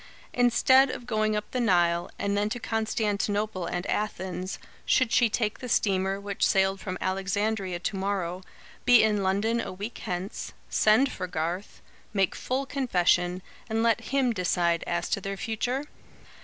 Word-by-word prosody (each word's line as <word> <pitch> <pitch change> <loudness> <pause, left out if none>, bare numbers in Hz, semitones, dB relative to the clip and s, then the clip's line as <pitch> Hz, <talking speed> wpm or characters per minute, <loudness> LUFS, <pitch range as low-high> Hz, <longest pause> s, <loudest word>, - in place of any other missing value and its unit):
Instead 260 +2 +5
of 245 - -6
going 215 -2 0
up 210 - -4
the 255 - -1
Nile, 175 -6 +2
and 200 0 -1
then 205 +1 +1
to 245 - -3
Constantinople 210 -3 -1
and 175 +2 -3
Athens, 190 -3 -3 0.3
should 255 -4 +2
she 240 -2 +4
take 215 -1 -1
the 250 - -6
steamer 195 -2 +1
which 200 0 -4
sailed 190 0 +3
from 185 -2 -4
Alexandria 195 0 -1
to 190 +4 -3
morrow, 190 -2 -2 0.4
be 245 -2 +7
in 210 -2 +2
London 205 +5 +1
a - - -5
week 205 +5 -6
hence, 180 +2 -5 0.2
send 225 +6 +4
for 185 - -4
Garth, 175 +3 -4 0.3
make 195 -3 +2
full 265 +2 -2
confession, 180 -9 +1 0.3
and 225 +1 0
let 230 -1 +2
him 265 -3 +1
decide 175 -3 +1
as 175 0 -1
to 200 - -1
their 195 +1 -4
future? 245 +7 -2
200 Hz, 155 wpm, -27 LUFS, 185-225 Hz, 0.4 s, be